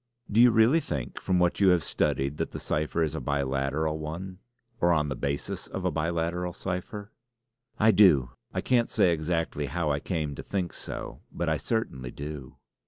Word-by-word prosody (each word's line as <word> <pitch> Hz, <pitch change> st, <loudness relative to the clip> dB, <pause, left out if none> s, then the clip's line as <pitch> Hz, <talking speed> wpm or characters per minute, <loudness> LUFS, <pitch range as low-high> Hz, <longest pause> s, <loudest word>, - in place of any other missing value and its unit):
"Do 110 Hz, +3 st, +5 dB
you 125 Hz, -, +8 dB
really 115 Hz, +7 st, +5 dB
think 70 Hz, -, -5 dB
from 95 Hz, -1 st, +1 dB
what 90 Hz, -1 st, +2 dB
you 100 Hz, -, +5 dB
have 90 Hz, -3 st, +4 dB
studied 70 Hz, 0 st, 0 dB
that -, -, -3 dB
the -, -, -4 dB
cipher 75 Hz, +2 st, -1 dB
is 75 Hz, -, -1 dB
a -, -, -4 dB
biliteral 70 Hz, +3 st, -1 dB
one, 90 Hz, +5 st, -6 dB, 0.4 s
or 85 Hz, -, +3 dB
on 75 Hz, -2 st, +1 dB
the 65 Hz, -, -2 dB
basis 70 Hz, +3 st, -3 dB
of -, -, -5 dB
a -, -, +2 dB
biliteral 85 Hz, +3 st, -1 dB
cipher?" 100 Hz, +3 st, -5 dB, 0.7 s
"I 110 Hz, +1 st, +5 dB
do! 75 Hz, -, +5 dB, 0.2 s
I -, -, -2 dB
can't 120 Hz, -2 st, +2 dB
say 85 Hz, -, +3 dB
exactly 80 Hz, -2 st, -1 dB
how 80 Hz, +2 st, -1 dB
I 70 Hz, -, 0 dB
came 75 Hz, -3 st, -2 dB
to -, -, -7 dB
think 95 Hz, -4 st, -3 dB
so; -, -, -7 dB
but 85 Hz, -, -2 dB
I 80 Hz, -, +2 dB
certainly 70 Hz, -, -2 dB
do." 70 Hz, -1 st, -7 dB
80 Hz, 185 wpm, -28 LUFS, 70-90 Hz, 0.7 s, you